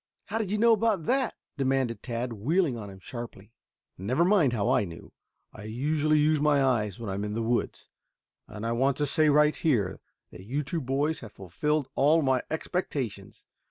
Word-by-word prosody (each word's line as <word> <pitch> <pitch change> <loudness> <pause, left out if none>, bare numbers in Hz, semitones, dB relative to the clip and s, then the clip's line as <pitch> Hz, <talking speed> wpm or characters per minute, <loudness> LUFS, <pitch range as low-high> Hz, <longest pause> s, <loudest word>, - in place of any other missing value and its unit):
"How 225 - -3
did 215 -4 -2
you 210 - +1
know 230 +2 +5
about 215 -6 +1
that?" 260 -1 +1 0.2
demanded 130 -5 0
Tad, 120 0 -3
wheeling 145 - +1
on 105 -3 -7
him 95 - -11
sharply. 115 -1 -9 0.5
"Never 125 - +1
mind 180 -9 +4
how 105 -4 -1
I - - +3
knew. 85 -4 -10 0.4
I 105 - -10
usually 150 +7 +1
use 150 0 +3
my 145 -2 +3
eyes 110 -7 0
when 115 - -6
I 95 - -2
am 100 +1 -3
in 105 0 -3
the 115 - -1
woods. 120 +1 -1 0.6
And 105 +1 -7
I 115 - 0
want 135 +3 +1
to 150 - +1
say, 155 +2 +3
right 150 +1 +4
here, 120 - 0 0.3
that 90 - -11
you 135 +9 -2
two 160 +4 -3
boys 140 +4 0
have 115 -4 -11
fulfilled 145 - -2
all 150 +4 +4
my 130 -2 +2
expectations. 125 - -4
135 Hz, 195 wpm, -28 LUFS, 110-155 Hz, 0.6 s, know